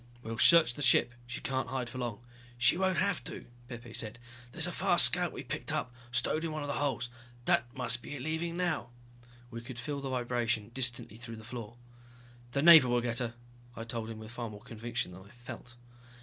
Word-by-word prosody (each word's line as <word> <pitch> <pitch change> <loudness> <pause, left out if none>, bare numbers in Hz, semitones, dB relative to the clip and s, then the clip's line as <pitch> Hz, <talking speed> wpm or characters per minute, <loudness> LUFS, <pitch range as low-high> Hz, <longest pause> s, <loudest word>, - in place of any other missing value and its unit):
"We'll 115 0 -5
search 165 -7 +7
the 145 - -8
ship, 120 -2 +4
she 120 - -5
can't 130 -1 -1
hide 130 -2 -2
for 130 +2 -7
long." 120 -4 -3 0.4
"She 125 +5 +5
won't 190 0 +1
have 200 -8 +1
to," - - -6 0.2
Pepe 120 -2 -8
said. 110 0 -4 0.3
"There's - - +1
a - - -2
fast - - +6
scout - - +3
we - - -7
picked - - -3
up, 125 - -2 0.2
stowed 155 +5 +1
in 165 - -2
one 155 -1 -3
of - - -4
the 140 - -1
holds. 135 -4 -1 0.4
That 120 +1 +2
must 120 -2 -2
be - - -7
it 130 - -6
leaving 165 +2 -2
now." 175 -9 -1 0.6
We 115 -1 -6
could 120 +1 -9
feel 140 +3 -4
the 135 - -4
vibration, 120 -4 0
distantly 120 -4 0
through 115 -1 -8
the 110 - -11
floor. 120 -1 -7 0.8
"The 140 - +1
Navy 160 -6 +10
will 120 0 +3
get 120 -1 0
her," 120 -2 -3 0.4
I 115 - -5
told 115 -1 -4
him, 115 - -6
with 110 0 -9
far 120 -1 -4
more 105 -1 -10
conviction 115 -3 -4
than 90 +1 -11
I 100 - -17
felt. 120 +1 -10
120 Hz, 215 wpm, -32 LUFS, 115-140 Hz, 0.8 s, Navy